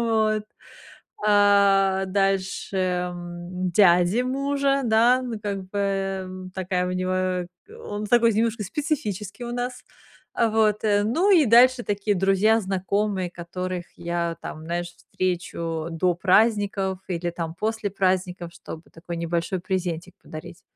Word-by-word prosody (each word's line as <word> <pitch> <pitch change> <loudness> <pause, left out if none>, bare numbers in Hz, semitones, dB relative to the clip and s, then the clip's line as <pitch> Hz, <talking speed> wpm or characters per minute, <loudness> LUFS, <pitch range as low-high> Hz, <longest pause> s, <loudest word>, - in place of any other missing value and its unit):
вот. 220 -2 +1 0.8
А 200 -2 +4
дальше, 195 0 -1
м, 180 0 -3
дяде 180 +4 +4
мужа, 275 +1 0
да, 235 +3 +4
ну 235 -4 -5
как 195 -2 -5
бы, 205 - -5
м, 190 -2 -3
такая 185 -1 -1
у - - -2
него 185 -1 -1 0.4
он 205 +1 -4
такой 230 -1 +4
немножко 225 0 0
специфический 215 - -3
у 240 - -5
нас, 250 +1 -4 0.5
а, 230 -1 +2
вот. 215 -1 +2
Ну 220 - +2
и 325 -7 +6
дальше 240 +2 +6
такие 205 0 0
друзья, 195 +4 +3
знакомые, 190 -1 -1
которых 180 +1 -5
я 170 -1 -2
там, 155 - -7
знаешь, 175 +1 -2
встречу 170 -3 -3
до 175 +2 +1
праздников 195 -1 +2
или 175 -1 -2
там 165 -1 -5
после 220 +1 -2
праздников, 185 -2 -1
чтобы 160 -1 -9
такой 170 +1 -7
небольшой 170 +2 -2
презентик 180 -1 -3
подарить. 170 +3 -10
195 Hz, 125 wpm, -24 LUFS, 180-215 Hz, 0.8 s, и